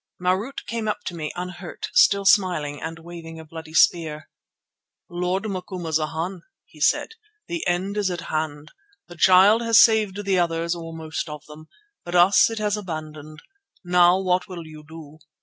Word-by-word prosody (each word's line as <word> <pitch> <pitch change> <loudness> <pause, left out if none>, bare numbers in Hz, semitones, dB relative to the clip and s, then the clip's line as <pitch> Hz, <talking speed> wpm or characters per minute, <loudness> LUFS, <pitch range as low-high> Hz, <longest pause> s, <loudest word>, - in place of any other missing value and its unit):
Marût 185 +9 -2
came 230 -1 -4
up 210 - -2
to 180 - -5
me, 155 -2 -4
unhurt, 180 0 -7
still 200 0 +4
smiling 175 -8 +2
and 165 0 -5
waving 165 -1 -10
a 160 - -10
bloody 160 0 -10
spear. 155 -4 +2 0.8
"Lord 180 +3 -1
Macumazana," 175 -2 -3 0.3
he - - -18
said, - - +2 0.4
"the 340 -1 -4
end 185 +4 -1
is 205 -2 +1
at 175 -1 -4
hand. 155 -2 -4 0.4
The 175 - -11
Child 190 +6 +6
has 230 -1 +3
saved 215 -3 +4
the 190 -2 +2
others, 170 0 0
or 165 -1 -7
most 160 0 -5
of 150 -1 -9
them, 155 +1 -13 0.4
but 175 0 -5
us 180 +5 +6
it 225 - -6
has 210 -1 -1
abandoned. 155 -5 -8 0.4
Now 180 +1 +4
what 185 0 0
will 175 -4 -8
you 155 -1 -12
do? 155 -1 -13
175 Hz, 165 wpm, -23 LUFS, 160-190 Hz, 0.8 s, Child